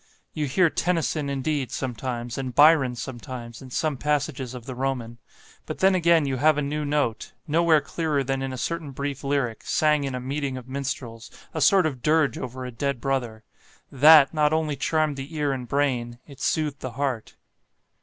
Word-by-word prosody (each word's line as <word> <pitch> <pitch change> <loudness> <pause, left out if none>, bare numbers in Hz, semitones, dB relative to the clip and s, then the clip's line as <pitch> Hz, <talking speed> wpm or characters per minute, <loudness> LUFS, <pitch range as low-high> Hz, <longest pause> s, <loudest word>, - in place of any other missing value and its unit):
You 150 -2 -2
hear 165 +4 +3
Tennyson, 165 -4 0
indeed, 140 -1 -2
sometimes, 120 -1 -4
and 130 -2 -5
Byron 145 -4 +5
sometimes, 120 -1 -7
in 130 - -10
some 150 +2 -1
passages 140 -3 -2
of 120 -2 -9
the 130 - -6
Roman; 125 -3 -3 0.5
but - - -5
then 190 0 +4
again 170 -3 +4
you 135 -2 -1
have 155 +3 +4
a 150 - 0
new 150 +2 -2
note, 145 -6 -1
nowhere 160 0 +4
clearer 145 +1 -1
than 135 0 -2
in 135 0 -3
a 130 - -5
certain 160 +1 -3
brief 140 +1 -4
lyric, 135 -5 -1
sang 150 -2 +2
in 135 -2 -3
a - - -3
meeting 135 +1 -3
of 125 -1 -9
minstrels, 130 -4 -5 0.2
a - - -3
sort 190 -3 +5
of 135 -6 -3
dirge 150 -2 +2
over 130 +1 -6
a 125 - -6
dead 140 +2 -2
brother; 120 -4 -2 0.5
THAT 145 +1 +7
not 150 -1 +2
only 155 -2 0
charmed 155 +1 0
the 140 +4 -7
ear 145 -2 0
and 125 -2 -5
brain, 125 -4 -1
it 140 -3 -14
soothed 150 -3 0
the 130 -2 -6
heart." 130 -4 -3
140 Hz, 185 wpm, -25 LUFS, 125-150 Hz, 0.5 s, THAT